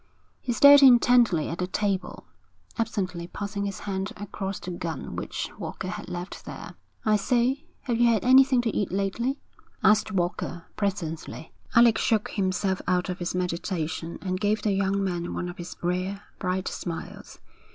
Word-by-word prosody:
He 250 - -2
stared 285 +4 +8
intently 240 - +6
at 165 - -5
the 180 - -1
table, 190 -1 -2 0.5
absently 190 -7 -2
passing 200 +2 -4
his 195 -2 -6
hand 195 0 -3
across 200 -1 -5
the 180 - -7
gun 165 -4 -5
which - - -4
Walker 185 - -5
had 210 0 -6
left 180 +2 -6
there. - - -8 0.3
'I 215 -1 +4
say, 250 +7 +1 0.2
have 240 -3 -1
you 240 - +6
had 220 0 0
anything 260 0 +6
to 225 - -1
eat 200 - 0
lately?' 200 +8 -1 0.5
asked 215 0 +4
Walker, 175 -2 -2
presently. 170 -6 -4 0.2
Alec 235 -1 +6
shook 220 -2 +1
himself 190 -1 0
out 180 0 +1
of 180 - -4
his 175 0 -3
meditation 170 -2 -3
and 185 -1 -2
gave 210 +2 0
the 210 - +2
young 195 0 +1
man 175 -2 -2
one 175 - -3
of 175 +2 -8
his 175 +1 -7
rare, 185 +3 -2 0.2
bright 185 -1 -1
smiles. 170 -2 -6
195 Hz, 160 wpm, -26 LUFS, 180-215 Hz, 0.5 s, stared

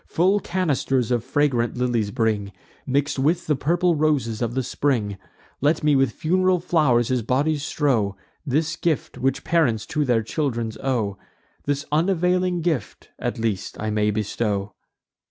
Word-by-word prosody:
Full 190 +5 +2
canisters 140 - 0
of 120 -2 +1
fragrant 130 -3 +1
lilies 120 -4 0
bring, 110 -3 0 0.4
Mix'd 140 +1 0
with 165 +6 +1
the 150 - +2
purple 175 +6 +2
roses 140 -8 0
of 120 0 -1
the 130 - 0
spring; 110 -9 -1 0.4
Let 150 +3 +2
me 150 -1 +4
with 135 -3 +3
fun'ral 185 +6 +1
flow'rs 150 -9 +2
his 130 -2 +1
body 140 +7 +1
strow; 125 -9 0 0.3
This 155 +3 0
gift 165 -3 -2
which 135 +2 0
parents 130 -11 +1
to 150 -1 -1
their 120 -5 +2
children 120 -3 -2
owe, 110 -7 -1 0.5
This 145 +1 -1
unavailing 180 +2 +1
gift, 155 -10 -3
at - - -2
least, 110 -4 -2
I 110 0 -2
may 105 0 +1
bestow!" 105 -1 -2
135 Hz, 150 wpm, -23 LUFS, 115-155 Hz, 0.5 s, me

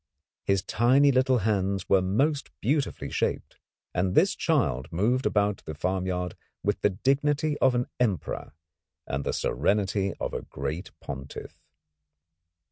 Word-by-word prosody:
His 100 -2 +2
tiny 135 +5 +4
little 130 0 +3
hands 100 -3 0
were 95 - +4
most 135 +11 +1
beautifully 140 +5 -1
shaped, - - -2 0.4
and 90 +1 0
this - - +5
child 65 +5 0
moved 120 +9 +1
about 105 -1 +1
the 80 - -5
farmyard 90 +1 -2 0.3
with 105 0 0
the - - +4
dignity 145 +8 +1
of 130 - +4
an 120 0 +1
Emperor 105 -10 -1 0.5
and 70 +1 -3
the - - -1
serenity 100 -1 0
of - - -3
a - - -2
great 75 +7 -5
Pontiff. 70 +1 -7
100 Hz, 130 wpm, -27 LUFS, 90-130 Hz, 0.5 s, this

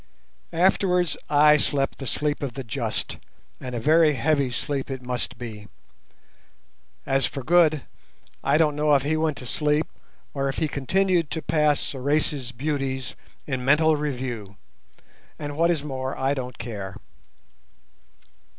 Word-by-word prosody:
Afterwards 180 -1 +3
I 150 0 +6
slept 140 -1 0
the 135 - -5
sleep 150 +2 -1
of 140 -4 -3
the 135 - -4
just, 115 -2 -3 0.4
and 125 -1 -6
a - - -1
very 155 +4 +5
heavy 140 +1 +1
sleep 135 +3 -3
it 130 -1 -5
must 125 0 -3
be. 110 -4 -8 1.4
As 135 -1 +2
for 135 - -6
Good, 155 -2 +4 0.6
I - - +3
don't 155 -2 +3
know 150 0 +3
if 135 - +2
he 150 +2 +1
went 155 -2 0
to 125 - -8
sleep 150 +4 +1 0.5
or 140 -1 -1
if 135 - -4
he 160 - +1
continued 170 +4 +1
to 160 - -4
pass 150 -1 +2
Sorais' 140 -1 -1
beauties 130 -1 -3 0.3
in 130 -3 -3
mental 155 +4 +4
review, 125 -8 -4 0.8
and, 145 -1 -5
what 165 +2 +3
is 160 -4 +1
more, 130 -2 -4
I 135 +1 +1
don't 125 -3 -5
care. 100 -5 -6
140 Hz, 145 wpm, -25 LUFS, 130-155 Hz, 1.4 s, I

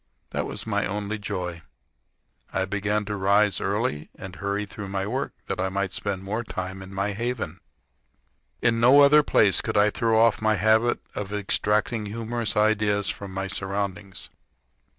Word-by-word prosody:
That - - -2
was - - -4
my - - 0
only 105 +1 -3
joy. 90 -4 -4 0.9
I 95 - 0
began 105 +2 -1
to 105 0 -3
rise 100 0 +3
early 100 -6 -1
and 95 -2 -8
hurry 100 +1 -2
through 100 0 -8
my 95 0 -2
work, 130 +6 -2
that - - -3
I 95 +1 0
might 95 0 -2
spend 95 -1 -3
more 110 +5 -2
time 95 -3 -5
in 95 0 -10
my 100 +1 -1
haven. 110 -5 -3 1.0
In 115 -1 +3
no 130 +5 +7
other 145 +2 +7
place 105 -8 +3
could - - -2
I 105 +1 +5
throw 115 -1 +2
off 115 0 +4
my 110 0 +3
habit 110 +3 +3
of 100 -1 -5
extracting 105 +2 0
humorous 115 +1 -2
ideas 105 -1 +2
from 100 -1 -5
my 95 +1 -3
surroundings. 95 0 -3
105 Hz, 165 wpm, -25 LUFS, 95-110 Hz, 1.0 s, no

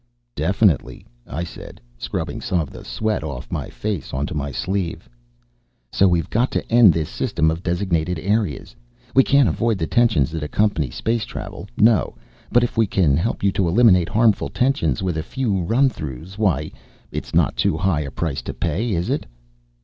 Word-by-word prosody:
"Definitely," - - +1 0.2
I 85 +6 -4
said, 85 - -10 0.2
scrubbing - - -4
some 90 - 0
of 75 -5 -3
the - - -10
sweat 110 -6 -2
off 70 -6 -6
my - - -3
face 100 -11 -4
onto 70 +2 -2
my 70 -1 -3
sleeve. 95 +3 -3 0.8
"So 100 - +4
we've 85 -2 +1
got 120 +4 +2
to - - -3
end 115 -4 +7
this 80 -1 -1
system 80 +1 0
of 80 +2 -4
designated 90 -2 -1
areas. 100 -2 -1 0.4
We 135 - +6
can't 140 -2 +4
avoid 115 -2 0
the 80 - -1
tensions 85 - +2
that 80 -1 -4
accompany 80 -2 0
space 115 - -1
travel, - - -7
no. 110 0 +3 0.4
But 120 0 +4
if 120 - -2
we 115 -2 +4
can 85 -8 +2
help 100 +9 -1
you 100 - +3
eliminate 90 -1 +4
harmful 110 -1 +2
tensions 95 - 0
with 90 -4 -1
a - - 0
few 105 +1 -1
run 115 +10 +3
throughs, 80 - -6
why, 95 -8 0 0.4
it's - - -5
not - - +3
too - - +1
high 95 -4 +1
a 70 - -4
price 70 +1 -3
to - - -6
pay, 95 +8 -1
is 85 0 -1
it?" - - -2
90 Hz, 180 wpm, -21 LUFS, 80-110 Hz, 0.8 s, end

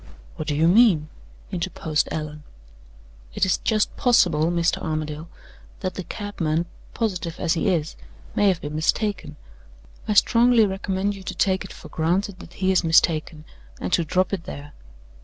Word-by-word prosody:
"What 155 - -6
do 150 - 0
you 160 +3 +3
mean?" 180 -6 +5 0.4
interposed 170 -4 -1
Allan. 150 -1 -5 0.9
"It - - +2
is 190 - +1
just 215 -2 0
possible, 175 - +3
Mr. 170 0 +1
Armadale, 155 0 -4 0.5
that 185 -2 -2
the 185 - -5
cabman, 170 -6 -2 0.3
positive 180 -7 -2
as 170 -3 +1
he 170 - -1
is, 165 -3 -1 0.4
may 205 - +3
have 185 -4 +2
been 145 0 -5
mistaken. 170 0 -1 0.7
I 210 - 0
strongly 235 +1 +5
recommend 195 0 -1
you 195 - -10
to 190 0 -6
take 190 +1 +1
it 190 - -10
for - - -11
granted 185 +4 -1
that 175 - -12
he 190 +1 0
is 185 -1 +3
mistaken, 160 -1 +2 0.3
and 90 - -3
to 170 - +3
drop 185 +4 0
it 185 -4 -3
there." 145 +1 -8
175 Hz, 160 wpm, -23 LUFS, 155-195 Hz, 0.9 s, mean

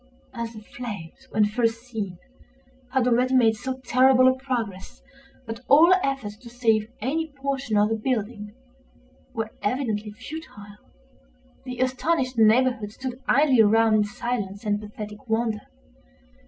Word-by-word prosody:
As 235 -2 -5
the 215 - -10
flames, 220 +1 -8
when 215 -1 +3
first 230 +2 0
seen, 215 -7 -5 0.7
had 260 -2 +2
already 250 +2 +2
made 225 -3 +5
so 260 +3 -5
terrible 255 +1 +5
a 260 - +6
progress 235 -8 -5 0.4
that 225 0 -6
all 325 +6 +7
efforts 270 -7 -2
to 240 +1 -13
save 225 -3 +1
any 315 +8 -1
portion 275 -5 -2
of 210 +1 +4
the 225 - +1
building 215 -2 -3 0.8
were 225 -1 -3
evidently 215 -3 -1
futile, 205 -5 -10 0.9
the 250 -1 -6
astonished 255 +1 0
neighborhood 225 -1 +3
stood 255 +2 -6
idly 270 -4 +5
around 220 +1 +4
in 215 -1 +4
silent 205 -1 -4
and 205 -1 0
pathetic 210 +2 -9
wonder. 220 -1 0
230 Hz, 135 wpm, -25 LUFS, 210-255 Hz, 0.9 s, all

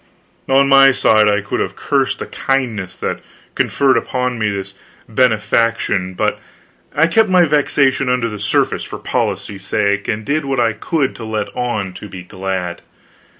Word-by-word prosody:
On 135 +1 +4
my 135 0 +7
side, 110 -4 +3
I 105 0 +2
could 100 - -3
have - - -2
cursed - - 0
the - - -5
kindness 115 -9 -2
that - - -3 0.3
conferred 135 -3 +2
upon 125 0 -2
me 110 -1 +1
this 100 -1 -5 0.3
benefaction, 110 -5 +1
but - - 0 0.6
I 160 - +4
kept 215 +6 +3
my 180 -2 +5
vexation 140 -3 +2
under 125 -2 +1
the 105 -2 -6
surface 100 0 0
for - - -7
policy's 95 -2 -3
sake, 100 0 0
and 105 0 -2
did 155 +2 0
what 135 -2 -1
I 115 -2 +2
could 135 +5 -1
to 115 - -8
let 110 -2 -4
on 110 -6 -2
to 105 - -10
be 90 -1 -9
glad. 95 -2 -4
115 Hz, 165 wpm, -17 LUFS, 100-135 Hz, 0.6 s, my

